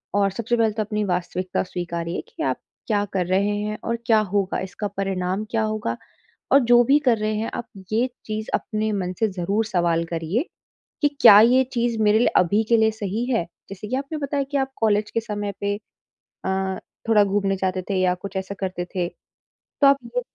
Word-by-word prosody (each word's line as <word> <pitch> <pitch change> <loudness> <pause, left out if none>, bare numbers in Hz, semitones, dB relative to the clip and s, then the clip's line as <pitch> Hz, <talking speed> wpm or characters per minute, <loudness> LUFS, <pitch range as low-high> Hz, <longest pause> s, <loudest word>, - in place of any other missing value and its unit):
और 200 -1 +3
सबसे 235 +4 -1
पहले 225 -1 +3
तो 215 0 -1
अपनी 210 0 -2
वास्तविकता 180 0 -1
स्वीकारिए 170 -1 -4
कि 475 - -6
आप - - 0 0.3
क्या 205 -2 +2
कर 185 -2 +1
रहे 200 +3 +1
हैं 210 +1 -3
और 235 0 -1
क्या 225 -3 +5
होगा 195 -2 +1
इसका 195 +2 -4
परिणाम 190 0 -1
क्या 225 -1 +1
होगा? 215 - -2 0.6
और 275 - +8
जो 240 0 +6
भी 275 +5 +5
कर 240 -4 +4
रहे 215 0 -1
हैं, 220 +2 -2
आप 240 - -5 0.2
ये 235 +4 +2 0.2
चीज़ 215 0 -4
अपने 215 0 -1
मन 185 -3 -2
से 220 - +3
ज़रूर 195 +3 -1
सवाल 170 -4 +1
करिए 165 - -1 0.6
कि 295 - +5
क्या 205 0 +10
ये 245 +4 +6
चीज़ 235 -2 0
मेरे 210 0 +4
लिए 245 - +4
अभी 200 +5 +3
के 235 - +5
लिए 220 0 +4
सही 215 +1 -3
है? 230 -8 +1 0.3
जैसे 200 +2 -7
कि 255 - -1
आपने 280 +3 -4
बताया 280 -1 -1
कि - - +1
आप 270 0 -1
कॉलेज 210 -1 +1
के 230 - 0
समय 205 -2 -4
पे 205 0 0 0.7
अ, 190 0 -1 0.3
थोड़ा 210 -2 +6
घूमने 195 0 0
जाते 185 0 -1
थे 200 - 0
या 180 -1 +3
कुछ 195 +2 -9
ऐसा 190 +1 -4
करते 185 -2 -3
थे। 180 -2 0 0.5
तो 280 - +1
आप 275 0 +6 0.2
ये - - +2
205 Hz, 205 wpm, -23 LUFS, 190-225 Hz, 0.7 s, क्या